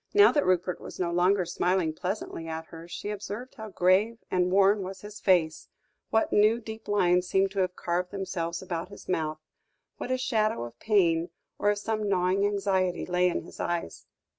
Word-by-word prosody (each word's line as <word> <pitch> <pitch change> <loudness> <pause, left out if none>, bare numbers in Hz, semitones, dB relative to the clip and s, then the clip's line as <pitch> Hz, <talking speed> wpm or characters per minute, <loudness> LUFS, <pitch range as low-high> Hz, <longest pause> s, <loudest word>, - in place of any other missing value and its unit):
Now 410 0 +8
that 290 - +1
Rupert 180 0 +1
was - - -9
no 175 -2 0
longer 180 +2 +3
smiling 175 -1 0
pleasantly 180 -2 -4
at 160 0 -5
her, 165 0 -10
she 205 +4 -5
observed 210 +5 -6
how 220 -3 -8
grave 195 +5 +2
and 180 0 +2
worn 200 +2 +4
was 190 0 -6
his 210 +1 -9
face, 175 -6 +2 0.4
what 220 - +1
new 215 +3 +4
deep 220 -1 -9
lines 180 -3 +2
seemed 195 +1 +2
to 195 - -3
have 185 -1 0
carved 180 +1 -2
themselves 175 -3 -4
about 175 -1 -4
his 200 - -12
mouth, 155 -3 -1 0.6
what - - -5
a 255 - +1
shadow 215 - 0
of 120 0 -9
pain, 175 -5 +2 0.3
or 205 - +2
of 205 - +1
some 215 0 -2
gnawing 185 +1 +2
anxiety 190 -3 0
lay 180 0 +2
in - - -2
his - - -13
eyes. 170 - -3
185 Hz, 190 wpm, -28 LUFS, 175-205 Hz, 0.6 s, Now